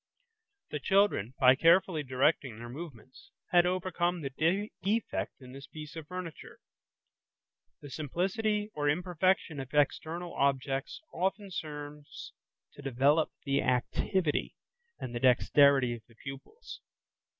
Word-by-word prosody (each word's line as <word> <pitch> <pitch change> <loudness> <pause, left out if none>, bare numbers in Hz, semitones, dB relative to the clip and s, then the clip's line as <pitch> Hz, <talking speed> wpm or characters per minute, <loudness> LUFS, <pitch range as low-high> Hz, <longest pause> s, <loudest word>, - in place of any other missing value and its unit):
The 150 - -2
children, 190 - +2
by 130 -1 +7
carefully 165 +2 +4
directing 130 -2 +1
their 120 +1 -8
movements, 130 -3 -10 0.2
had 175 0 +5
overcome 180 -1 -1
the 165 +9 0
defect 210 +4 -1
in 130 -2 -12
this 135 +1 -10
piece 155 +1 -9
of 160 -2 -7
furniture. 180 -2 -7 1.2
The 145 - -10
simplicity 200 - -1
or 145 -1 0
imperfection 175 -1 +1
of 135 -1 -7
external 160 +4 0
objects 135 - -1
often 195 +3 -2
serves 150 -3 -7 0.4
to - - -12
develop 140 +4 +2 0.2
the 140 0 +2
activity 145 - 0 0.4
and 120 - -6
the 120 - -2
dexterity 130 0 +5
of 120 - -8
the 115 - -21
pupils. 135 - -10
150 Hz, 120 wpm, -31 LUFS, 135-180 Hz, 1.2 s, by